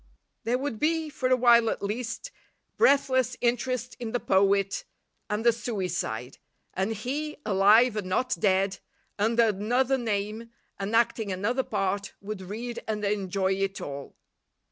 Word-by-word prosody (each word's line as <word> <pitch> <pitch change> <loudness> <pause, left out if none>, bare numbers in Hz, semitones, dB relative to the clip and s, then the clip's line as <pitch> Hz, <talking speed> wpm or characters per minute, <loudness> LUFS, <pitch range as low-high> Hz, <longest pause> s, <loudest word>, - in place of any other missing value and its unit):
There 240 +2 +2
would 260 -5 -4
be, 320 0 0
for 260 -3 -1
a 255 - +5
while 235 -2 +5
at - - -3
least, 230 - -4 0.4
breathless 260 - +3
interest 245 +1 -1
in 235 -2 -5
the 245 - +1
poet 195 - +2 0.5
and 210 +2 -2
the 235 - +6
suicide, 180 - -3 0.3
and 190 +4 -1
he, 285 +8 -4
alive 210 +4 +5
and 205 -3 -3
not 250 +7 +1
dead, 195 -1 +2 0.4
under 230 +3 +3
another 245 +6 +1
name 215 0 -3 0.3
and 200 +3 -2
acting 225 -3 +2
another 210 +8 0
part, 195 -4 -2
would 200 -1 -6
read 230 +6 -5
and 210 -1 -2
enjoy 195 -1 0
it 195 0 -2
all. 140 -1 -7
220 Hz, 145 wpm, -27 LUFS, 195-245 Hz, 0.5 s, the